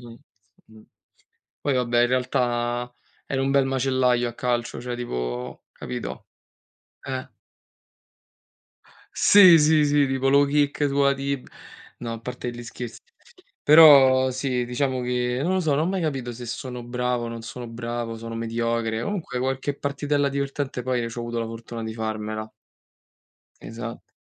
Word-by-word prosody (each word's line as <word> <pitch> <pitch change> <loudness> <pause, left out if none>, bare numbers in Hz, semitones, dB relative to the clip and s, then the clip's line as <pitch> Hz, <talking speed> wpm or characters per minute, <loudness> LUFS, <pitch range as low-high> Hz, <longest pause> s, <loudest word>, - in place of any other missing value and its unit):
Mh, 120 -1 -11 0.5
mh. 110 0 -17 0.8
Poi 145 - 0
vabbè 120 -1 +2
in - - +4
realtà 120 -1 -1 0.3
ero 135 -1 -1
un 135 - 0
bel 135 -1 +3
macellaio 130 -2 +1
a - - -6
calcio, 120 -1 -2
cioè 125 0 -5
tipo 60 - -5
capito? - - -7 0.8
Eh. 130 -1 -5 1.8
Sì, 185 -5 +8
sì, 155 0 +4
sì, 145 0 +3
tipo 135 0 0
low 140 +1 +5
kick 145 0 +1
sulla 140 0 +3
tib 140 -1 -4 0.5
no 115 -1 -4
a 115 - -7
parte 125 +1 -5
gli 120 0 -8
scherzi, 120 0 -8 0.6
però 140 -4 +8
sì 130 -1 -1
diciamo 130 +1 -1
che, 125 0 -1
non 180 +4 +1
lo 185 - +2
so, 160 -4 0
non 155 +4 +1
ho - - -1
mai 190 -1 -1
capito 135 -6 -2
se 120 +1 -8
sono 125 +1 -6
bravo 125 0 -2
o - - -4
non 115 0 -6
sono 120 +1 -8
bravo, 115 0 -4
sono 115 0 -7
mediocre. 115 0 -1
Comunque 175 -9 -3
qualche 135 +2 -2
partitella 145 0 0
divertente 140 -2 -3
poi 125 -2 -1
c'ho 115 - -7
avuto 120 0 -3
la 115 - -2
fortuna 115 0 -7
di 110 0 -5
farmela. 110 -1 -4 1.1
Esatt 115 0 -8
125 Hz, 150 wpm, -24 LUFS, 120-140 Hz, 1.8 s, Sì